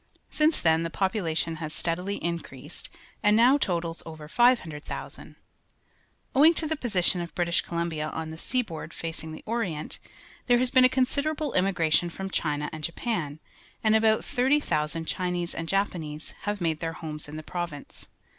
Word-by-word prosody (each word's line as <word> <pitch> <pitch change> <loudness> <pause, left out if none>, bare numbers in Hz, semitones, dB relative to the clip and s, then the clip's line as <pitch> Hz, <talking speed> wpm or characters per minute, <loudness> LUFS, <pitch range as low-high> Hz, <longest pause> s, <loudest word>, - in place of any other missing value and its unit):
Since 310 +1 +3
then 160 -1 +4
the 165 - -2
population 165 -4 0
has 155 -1 -5
steadily 180 +4 0
increased 165 -3 -4 0.3
and 210 +1 +5
now 255 +5 +6
totals 170 -6 -1
o\ 160 -1 -8
er 150 - -9
500,000. 180 -8 0 1.0
Owijig 310 +5 +7
to 320 - +3
the 315 +1 0
position 190 - +1
of 170 - -7
British 170 -1 +2
Columbia 170 -3 -2
on 160 0 -4
the 160 - -7
sea 255 +6 0
board 165 -5 -8
facing 160 -1 -5
the 155 - -9
Orient, 210 -10 -2 0.5
there 245 -1 +6
has 250 0 +2
been 255 -1 +7
a - - +6
considerable 280 +3 0
inmiigration 175 -3 +2
from 190 +3 -6
China 150 -3 0
and 155 -1 -7
Japan, 170 - -2 0.4
and 220 0 +5
about 220 0 +3
30,000 245 - +1
Cliinese 180 0 -1
and 165 0 -4
Japanese 165 -6 -1
have 205 -1 -2
made 160 -2 0
their 165 -1 -3
homes 155 -2 -6
in 150 - -7
the 155 - -6
province. 170 -4 -6
175 Hz, 165 wpm, -27 LUFS, 160-225 Hz, 1.0 s, Owijig